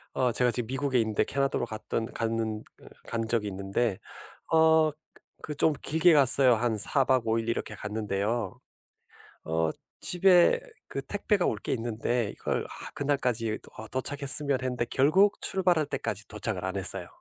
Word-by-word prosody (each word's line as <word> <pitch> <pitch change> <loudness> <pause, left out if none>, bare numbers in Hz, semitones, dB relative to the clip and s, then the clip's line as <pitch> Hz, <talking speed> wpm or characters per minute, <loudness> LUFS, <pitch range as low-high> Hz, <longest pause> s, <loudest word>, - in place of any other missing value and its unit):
어 125 -2 +1
제가 125 +1 +2
지금 120 -2 -3
미국에 135 -1 0
있는데 110 -1 +1
캐나다로 135 -1 -1
갔던 115 0 -4
갔는 115 -1 -2 0.2
으 - - -23 0.2
간 115 -1 -3
적이 110 -2 0
있는데 100 +2 -2 0.6
어 160 -1 +4 0.5
그 150 - -6
좀 155 - +3
길게 160 +3 +3
갔어요. 135 -3 +6
한 115 0 -1
4 135 +7 +4
박 130 -3 +1
5 110 +1 +1
일 115 0 -4
이렇게 115 -2 -3
갔는데요. 105 0 -3 0.9
어 80 0 0 0.3
집에 180 - +4 0.3
그 135 - -4
택배가 205 +2 -1
올 110 - -1
게 - - -5
있는데 115 -1 -2
이걸 - - -3
'아 - - -10
그날까지 125 -6 -1 0.2
어 110 - -7
도착했으면.' 140 +1 +1
했는데 125 -2 -2
결국 175 +10 +3
출발할 180 -5 +2
때까지 110 -5 -4
도착을 105 -3 -4
안 95 +1 -3
했어요. 95 - +2
120 Hz, 305 characters per minute, -27 LUFS, 110-145 Hz, 0.9 s, 갔어요